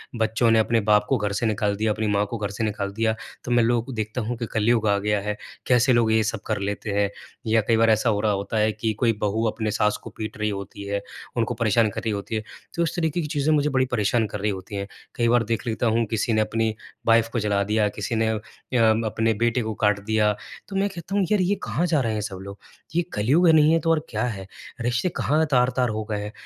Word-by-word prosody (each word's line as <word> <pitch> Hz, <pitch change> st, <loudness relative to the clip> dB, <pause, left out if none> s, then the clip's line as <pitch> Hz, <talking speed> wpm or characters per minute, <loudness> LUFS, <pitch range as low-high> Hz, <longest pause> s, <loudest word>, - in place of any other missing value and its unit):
बच्चों 115 Hz, +1 st, +2 dB
ने 115 Hz, -, +5 dB
अपने 115 Hz, +1 st, +2 dB
बाप 105 Hz, 0 st, +5 dB
को 135 Hz, -, +3 dB
घर 105 Hz, -2 st, -1 dB
से 105 Hz, -, -1 dB
निकाल 105 Hz, -2 st, 0 dB
दिया, 110 Hz, +1 st, 0 dB
अपनी 110 Hz, +1 st, -1 dB
माँ 105 Hz, 0 st, +2 dB
को 115 Hz, -, -3 dB
घर 105 Hz, -2 st, -3 dB
से 105 Hz, +3 st, -3 dB
निकाल 100 Hz, -2 st, -2 dB
दिया 110 Hz, +1 st, +1 dB, 0.3 s
तो 120 Hz, -, -4 dB
मैं 120 Hz, -1 st, +4 dB
लोग 120 Hz, 0 st, +1 dB
को 135 Hz, -, -7 dB
देखता 110 Hz, +2 st, -3 dB
हूँ 115 Hz, +2 st, -3 dB
कि 115 Hz, -, -3 dB
कलयुग 110 Hz, 0 st, +2 dB
आ 100 Hz, -1 st, +3 dB
गया 105 Hz, +1 st, 0 dB
है, 105 Hz, +1 st, -3 dB, 0.3 s
कैसे 125 Hz, +1 st, +4 dB
लोग 115 Hz, -2 st, +3 dB
ये 110 Hz, 0 st, +3 dB
सब 110 Hz, 0 st, -2 dB
कर 110 Hz, -2 st, -1 dB
लेते 100 Hz, +1 st, -3 dB
हैं, 100 Hz, 0 st, +1 dB, 0.4 s
या 110 Hz, 0 st, +4 dB
कई 115 Hz, -, +4 dB
बार 115 Hz, 0 st, +4 dB
ऐसा 110 Hz, +2 st, +3 dB
हो 105 Hz, -2 st, +1 dB
रहा 105 Hz, -1 st, +2 dB
होता 100 Hz, +2 st, -2 dB
है 110 Hz, 0 st, +3 dB
कि 110 Hz, +1 st, -2 dB
कोई 115 Hz, +2 st, +1 dB
बहू 105 Hz, +2 st, 0 dB
अपने 110 Hz, 0 st, -2 dB
सास 105 Hz, 0 st, +1 dB
को -, -, -7 dB
पीट 110 Hz, -1 st, -5 dB
रही 105 Hz, 0 st, 0 dB
होती 100 Hz, 0 st, -6 dB
है, 100 Hz, 0 st, -2 dB, 0.3 s
उनको 115 Hz, -3 st, 0 dB
परेशान 115 Hz, -1 st, +2 dB
कर -, -, -5 dB
रही 110 Hz, -, -1 dB
होती 100 Hz, +2 st, -4 dB
है। 110 Hz, -, -2 dB, 0.3 s
तो 170 Hz, -, +1 dB
इस 165 Hz, 0 st, -2 dB
तरीके 170 Hz, -1 st, 0 dB
की 155 Hz, -, -3 dB
चीज़ें 150 Hz, 0 st, +1 dB
मुझे 150 Hz, 0 st, +2 dB
बड़ी 130 Hz, -2 st, +2 dB
परेशान 110 Hz, 0 st, +2 dB
कर 105 Hz, -, -6 dB
रही 105 Hz, +2 st, 0 dB
होती 95 Hz, +1 st, -7 dB
हैं, 100 Hz, 0 st, -3 dB, 0.3 s
कई 120 Hz, -, +1 dB
बार 120 Hz, 0 st, +4 dB
देख 115 Hz, +2 st, -2 dB
लेता 115 Hz, +1 st, 0 dB
हूँ 115 Hz, +1 st, +2 dB
किसी 110 Hz, +1 st, 0 dB
ने 110 Hz, -, +3 dB
अपनी 110 Hz, +1 st, 0 dB, 0.4 s
वाइफ़ 115 Hz, 0 st, +4 dB
को 120 Hz, -, +1 dB
जला 105 Hz, -2 st, +1 dB
दिया, 105 Hz, +1 st, +1 dB
किसी 105 Hz, +3 st, -4 dB
ने 110 Hz, 0 st, +1 dB
अ, 110 Hz, -1 st, -1 dB, 0.7 s
अपने 110 Hz, +1 st, +1 dB
बेटे 120 Hz, +3 st, +1 dB
को 110 Hz, -1 st, -3 dB
काट 105 Hz, -1 st, +3 dB
दिया 110 Hz, -1 st, +2 dB, 0.4 s
तो 195 Hz, -, -7 dB
मैं 195 Hz, +1 st, +1 dB
कहता 190 Hz, +1 st, -6 dB
हूँ 200 Hz, -, +3 dB
यार 210 Hz, -, +4 dB
ये 185 Hz, +3 st, +2 dB
कहाँ 170 Hz, -, 0 dB
जा 160 Hz, -3 st, +2 dB
रहे 115 Hz, -3 st, -1 dB
हैं 105 Hz, -, -2 dB
सब 100 Hz, -2 st, -5 dB
लोग, 100 Hz, +1 st, -8 dB, 0.4 s
ये 175 Hz, -, +4 dB
कलयुग 135 Hz, +12 st, +3 dB
नहीं 155 Hz, -1 st, +6 dB
है 165 Hz, -, +4 dB
तो 165 Hz, -, -1 dB
और 165 Hz, -, +3 dB
क्या -, -, -2 dB
है, 100 Hz, -6 st, -4 dB, 0.3 s
रिश्ते 120 Hz, +8 st, 0 dB
कहाँ 155 Hz, +2 st, +2 dB
तार-तार 125 Hz, -1 st, +2 dB
हो 110 Hz, 0 st, -2 dB
गए 105 Hz, -, -1 dB
हैं, 105 Hz, -, -6 dB
110 Hz, 265 wpm, -24 LUFS, 105-120 Hz, 0.7 s, नहीं